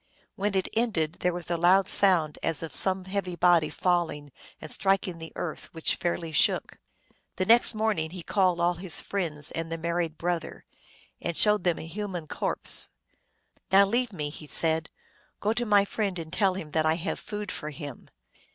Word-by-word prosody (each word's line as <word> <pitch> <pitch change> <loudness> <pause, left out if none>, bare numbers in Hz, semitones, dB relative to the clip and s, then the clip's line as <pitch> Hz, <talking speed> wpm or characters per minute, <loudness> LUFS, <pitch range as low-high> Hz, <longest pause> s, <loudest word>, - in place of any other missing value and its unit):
When 200 0 -2
it 190 - +1
ended 190 -9 0
there 180 - +1
was 175 -1 -3
a 170 - +1
loud 185 +3 +4
sound 175 -7 +4
as 165 -1 -2
of 160 - -6
some 190 -1 +3
heavy 190 -2 -3
body 175 -3 +3
falling 165 -5 -1 0.3
and 155 - -6
striking 190 -3 +1
the 160 0 -8
earth, 160 - -6
which 160 - +1
fairly 170 -2 -3
shook. 150 - +1 0.6
The 185 - -1
next 235 +1 +6
morning 215 -7 0
he 180 0 -8
called 185 -3 +1
all 175 +1 +2
his 175 0 +3
friends 160 -7 -2
and 165 0 -4
the 165 - -2
married 170 -1 -2
brother, 175 -1 -4 0.6
and 170 -2 -3
showed 210 0 +3
them 175 -2 +2
a - - -7
human 180 -1 -5
corpse. - - -1 0.8
"Now 195 +1 +7
leave 240 +4 -1
me," 150 -6 -4
he 150 0 -10
said. 160 0 +3
u - - -50 0.4
Go 210 +2 0
to 240 0 -2
my 205 -1 +4
friend 200 -3 -2
and 160 -1 -8
tell 195 -3 +2
him 160 -5 -7
that 155 0 +1
I 160 - +3
have 170 +2 -4
food 210 -2 -6
for 150 - -5
him." 145 -4 -9
175 Hz, 190 wpm, -27 LUFS, 160-195 Hz, 0.8 s, Now